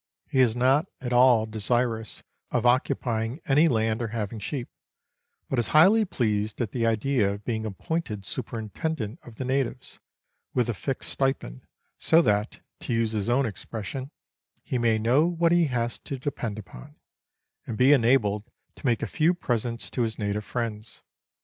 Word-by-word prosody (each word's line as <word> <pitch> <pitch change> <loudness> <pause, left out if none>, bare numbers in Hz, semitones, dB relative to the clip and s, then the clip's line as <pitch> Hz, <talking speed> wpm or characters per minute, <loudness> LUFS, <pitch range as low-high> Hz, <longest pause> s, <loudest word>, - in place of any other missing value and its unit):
He 135 - 0
is 120 -3 +4
not 135 +7 +3
at 125 -2 -3
all 120 -3 +6
desirous 110 0 -1 0.3
of 125 -1 0
occupying 120 0 +1
any 150 +4 +4
laud 110 -4 +1
or 115 - -1
having 110 -1 -4
sheep, 125 +4 -4 0.8
but 135 - 0
is 120 - +1
highly 210 +7 +6
pleased 110 - -1
at 120 -5 -1
the 115 -2 0
idea 115 -1 +1
of 100 +1 -7
being 110 -2 -2
appointed 105 - -4
superintendent 115 +2 -4
of 120 - -13
the 130 - -4
natives, 130 -1 -2 0.6
with 120 -2 +2
a - - +1
fixed 135 +5 -4
stipend, 135 - -2 0.3
so 160 - +5
that, 105 -1 0 0.2
to - - -3
use 115 -1 +1
his 105 -1 -2
own 130 +3 +3
expression, 115 +4 -6 0.3
" - - -48
he 130 -4 -2
may 115 -2 +3
know 125 +9 +3
what 170 -1 +2
he 175 -1 +4
has 120 -4 -2
to 140 - -6
depend 125 -5 -4
upon," 80 -12 -11 0.7
and 110 - -4
be 130 +3 +6
enabled 115 -5 +3 0.3
to - - -12
make 120 -2 +1
a - - +1
few 160 - +2
presents 120 -6 -2
to 125 - -2
his 110 -2 -1
native 105 0 -2
friends. 110 -2 -5
120 Hz, 170 wpm, -26 LUFS, 110-135 Hz, 0.8 s, all